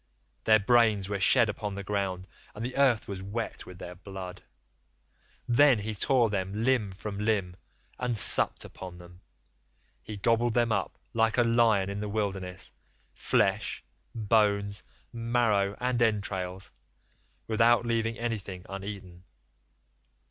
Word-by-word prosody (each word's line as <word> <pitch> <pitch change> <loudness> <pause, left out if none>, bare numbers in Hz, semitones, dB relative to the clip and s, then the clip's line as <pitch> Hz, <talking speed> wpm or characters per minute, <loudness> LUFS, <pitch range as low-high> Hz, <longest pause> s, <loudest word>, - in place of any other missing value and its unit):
Their 110 0 +6
brains 110 -3 +3
were 100 -1 -2
shed 110 +4 +5
upon 105 -1 -4
the 100 - -5
ground, 95 -2 -3 0.3
and 110 +3 -5
the 130 +1 -5
earth 130 -5 +3
was 100 -2 -6
wet 105 +4 -5
with 90 - -10
their 90 -1 -8
blood. 95 0 -9 1.1
Then 130 +1 +5
he 105 +1 -4
tore 115 +2 +2
them 100 +2 -2
limb 120 -6 +2
from 100 +1 -6
limb 105 -4 0 0.4
and 125 -2 -1
supped 105 - +5
upon 90 -2 -10
them. 90 +1 -15 0.8
He 105 -1 -8
gobbled 115 +3 +1
them 120 -1 +2
up 100 -3 -2 0.2
like 115 0 +1
a 120 - +5
lion 115 -4 +3
in 100 - -4
the 105 0 -4
wilderness, 95 -4 -3 0.4
flesh, - - 0 0.3
bones, 105 -2 +1 0.3
marrow, 115 -4 +1
and 125 -1 -1
entrails, 95 -4 -1 0.7
without 115 +2 +3
leaving 115 -1 -1
anything 100 -6 -4
uneaten. 95 -2 -8
105 Hz, 135 wpm, -28 LUFS, 95-115 Hz, 1.1 s, Their